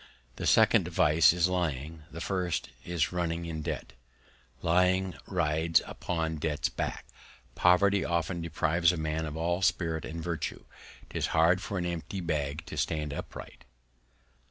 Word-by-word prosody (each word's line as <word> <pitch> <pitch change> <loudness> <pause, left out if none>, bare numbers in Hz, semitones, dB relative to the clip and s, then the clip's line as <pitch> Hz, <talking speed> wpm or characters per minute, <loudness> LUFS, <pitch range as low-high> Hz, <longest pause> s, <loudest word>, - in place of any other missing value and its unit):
The - - -2
second - - +5
Vice 75 +2 +5
is 85 0 +2
Lying, 80 -3 -2
the 85 - -8
first 90 -4 -1
is 85 -4 0
running 85 -1 -2
in 80 -2 -4
Debt. - - -5 0.7
Lying 90 +2 +3
rides 80 +2 +2
upon 80 -2 -3
Debt's 75 -1 -1
Back. - - -4 0.5
Poverty 100 +3 +4
often 85 +1 -1
deprives 85 +1 +2
a 90 - -4
Man 80 0 -2
of 75 +1 -6
all 85 +3 0
Spirit 80 -4 +1
and 80 +1 -6
Virtue: 85 -2 -4 0.5
'Tis - - -1
hard 85 +3 +5
for 100 - -4
an 90 - -1
empty 85 +3 -4
Bag 75 -3 -2
to - - -8
stand 75 -2 -1
upright. - - -8
85 Hz, 145 wpm, -29 LUFS, 80-90 Hz, 0.7 s, second